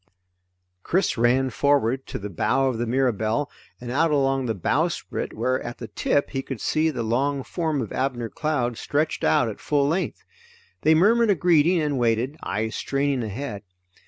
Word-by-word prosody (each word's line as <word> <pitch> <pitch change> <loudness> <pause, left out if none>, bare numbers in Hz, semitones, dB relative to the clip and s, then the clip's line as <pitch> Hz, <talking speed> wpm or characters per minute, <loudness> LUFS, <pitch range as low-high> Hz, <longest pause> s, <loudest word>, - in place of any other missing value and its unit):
Chris 185 - +1
ran 125 +3 +2
forward 135 -1 +1
to - - -4
the 105 - -6
bow 135 +8 +1
of 125 -3 -2
the 120 - -1
Mirabelle, 125 +1 0 0.3
and 120 0 -6
out 165 +5 +2
along 135 -3 +1
the 110 - -1
bowsprit 90 - -1
where, 130 0 -1
at 120 0 -6
the 115 - -8
tip, 140 - 0
he 135 - -2
could 135 -3 -6
see 155 +7 +1
the 125 -6 -3
long 135 +5 0
form 160 -5 -2
of 110 - -7
Abner 125 -3 -1
Cloud 125 -6 -1
stretched 150 +2 -1
out 150 -6 +3
at 110 - -6
full 145 -2 +1
length. 170 +6 -2 0.6
They 160 +1 +5
murmured 225 +7 +4
a 200 - +5
greeting 170 0 +3
and 145 -4 0
waited, 120 +4 +1
eyes 110 +1 -2
straining 140 -1 -1
ahead. 110 -1 -5
135 Hz, 175 wpm, -24 LUFS, 120-150 Hz, 0.6 s, They